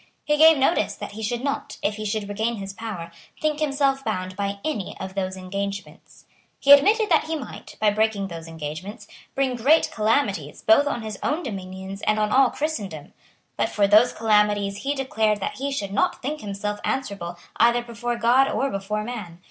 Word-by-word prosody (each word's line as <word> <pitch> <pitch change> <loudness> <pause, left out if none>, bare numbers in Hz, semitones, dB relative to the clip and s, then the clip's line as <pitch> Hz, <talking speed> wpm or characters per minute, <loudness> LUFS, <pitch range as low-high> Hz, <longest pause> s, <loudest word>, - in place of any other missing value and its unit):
He 300 - +2
gave 320 +1 +7
notice 270 +6 +2
that - - -7
he 215 +2 -8
should 235 +3 -2
not, 280 0 -3
if 205 +1 0
he 215 - -5
should 210 0 -2
regain 220 +3 -1
his 195 -2 -6
power, 195 -6 -6 0.3
think 305 -1 0
himself 275 -2 +1
bound 185 -5 -3
by 200 0 -2
any 275 -12 -3
of 190 0 -6
those 190 -1 -3
engagements. 200 +2 -6 0.3
He 280 - +4
admitted 420 +11 +7
that 315 - +4
he 320 +1 -2
might, 285 -5 -8
by 215 -1 +4
breaking 215 -2 0
those 165 -2 -8
engagements, 165 +7 -7 0.3
bring 265 -2 +1
great 280 +7 +3
calamities 210 - 0
both 255 +7 +5
on 240 -5 -2
his 215 -3 -6
own 310 +4 -1
dominions 190 -3 -6
and 215 - +3
on 210 0 +1
all 265 +1 +5
Christendom. 205 - -4 0.4
But - - +1
for 205 - +2
those 215 +4 +6
calamities 210 -2 +2
he 280 +5 -2
declared 220 -6 0
that 195 - -4
he 280 +2 -2
should 205 -8 -3
not - - +1
think 300 +3 -3
himself 205 0 -4
answerable 200 -9 -3 0.2
either 235 +1 +4
before 240 0 -3
God 240 +3 +4
or 275 +1 0
before 200 +2 -3
man. 210 -8 -7
215 Hz, 190 wpm, -24 LUFS, 200-270 Hz, 0.4 s, gave